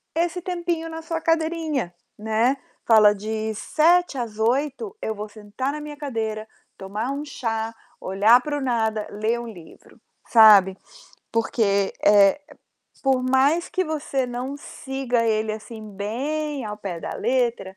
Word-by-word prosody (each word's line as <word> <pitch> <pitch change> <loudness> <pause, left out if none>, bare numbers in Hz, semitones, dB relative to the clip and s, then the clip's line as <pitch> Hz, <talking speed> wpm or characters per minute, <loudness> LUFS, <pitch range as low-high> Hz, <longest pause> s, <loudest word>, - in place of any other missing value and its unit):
esse 345 +1 0
tempinho 345 -2 -3
na 325 0 -6
sua 325 0 -4
cadeirinha, 320 - 0 0.3
né. 220 +5 +1 0.3
Fala: 215 -2 +6
"De 220 +1 -3
19:00 335 - +2
às 230 -4 -4
20:00 280 - 0
eu 220 - -3
vou 210 +1 -6
sentar 215 +5 -4
na 300 - -5
minha 300 0 -7
cadeira, 220 -7 -3 0.3
tomar 210 +6 -4
um 280 +1 -4
chá, 225 -5 -3 0.3
olhar 210 +6 +4
para 295 +2 -3
o - - -4
nada, 225 -4 0
ler 220 +3 -1
um 235 - -7
livro", 175 -8 -14 0.3
sabe. 205 -4 +7 0.6
Porque, 205 -3 +1
eh, 205 +5 +6 0.6
por 265 -2 +2
mais 270 +7 +2
que 370 0 -1
você 295 -4 -2
não 250 +3 -5
siga 270 -4 -3
ele, 215 -1 0
assim, 220 +1 -8 0.2
bem 285 +5 -3
ao 210 -1 -5
pé 190 -5 -6
da - - -5
letra, 235 -5 -1
240 Hz, 145 wpm, -23 LUFS, 215-295 Hz, 0.6 s, sabe